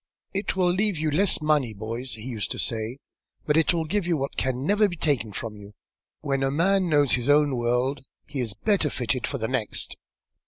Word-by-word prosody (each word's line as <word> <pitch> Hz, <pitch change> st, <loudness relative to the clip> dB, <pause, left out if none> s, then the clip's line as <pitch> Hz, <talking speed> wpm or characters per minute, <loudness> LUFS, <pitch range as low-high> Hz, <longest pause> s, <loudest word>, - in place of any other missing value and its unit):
'It 195 Hz, 0 st, -1 dB
will 180 Hz, -2 st, +3 dB
leave 200 Hz, 0 st, +1 dB
you 155 Hz, 0 st, 0 dB
less 175 Hz, 0 st, +2 dB
money, 145 Hz, -8 st, +2 dB
boys,' 115 Hz, +5 st, -4 dB
he 110 Hz, -, -10 dB
used 115 Hz, -6 st, -3 dB
to -, -, -4 dB
say, 115 Hz, +1 st, -1 dB, 0.5 s
'but 150 Hz, -, +2 dB
it 160 Hz, 0 st, +4 dB
will 165 Hz, -2 st, -1 dB
give 180 Hz, +3 st, -1 dB
what 150 Hz, -6 st, -1 dB
can 130 Hz, +1 st, -1 dB
never 210 Hz, +4 st, +4 dB
be 175 Hz, -, -5 dB
taken 140 Hz, -9 st, 0 dB
from 105 Hz, +2 st, -5 dB
you. 105 Hz, 0 st, -13 dB, 0.5 s
When 135 Hz, -2 st, -1 dB
a 135 Hz, -, +2 dB
man 185 Hz, +5 st, +2 dB
knows 145 Hz, -3 st, +3 dB
his 125 Hz, +2 st, +1 dB
own 145 Hz, -2 st, +4 dB
world, 125 Hz, +3 st, 0 dB, 0.2 s
he 140 Hz, -1 st, -5 dB
is 115 Hz, -5 st, -2 dB
better 185 Hz, -, +1 dB
fitted 125 Hz, -1 st, -1 dB
for 140 Hz, -, -2 dB
the 110 Hz, -3 st, -2 dB
next.' 125 Hz, -4 st, -2 dB
140 Hz, 205 wpm, -25 LUFS, 120-165 Hz, 0.5 s, it